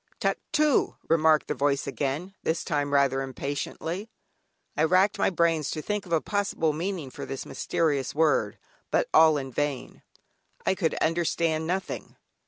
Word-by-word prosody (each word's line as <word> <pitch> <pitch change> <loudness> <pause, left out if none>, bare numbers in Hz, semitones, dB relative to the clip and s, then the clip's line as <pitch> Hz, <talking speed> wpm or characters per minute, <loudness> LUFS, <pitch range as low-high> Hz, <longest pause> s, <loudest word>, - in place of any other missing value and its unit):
"Tuctoo" 300 -2 +1
remarked 160 -1 +4
the - - 0
voice 140 -1 0
again, 145 +7 -3
this 160 - -1
time 145 -4 -1
rather 140 -1 +3
impatiently. 145 - -4 0.7
I 150 - +2
racked 185 +5 +3
my - - +3
brains 165 -4 +1
to 155 - -3
think 210 -2 -3
of - - -12
a 165 - +4
possible 195 -5 0
meaning 165 -3 -3
for - - -8
this 135 - -5
mysterious 145 -6 -1
word, 145 -10 +2 0.3
but - - +1
all 160 -1 +6
in 135 -2 -5
vain, 145 +1 -3 0.6
I - - +3
could 175 -4 0
understand 160 -1 0
nothing. 185 +2 -3
160 Hz, 150 wpm, -27 LUFS, 145-175 Hz, 0.7 s, all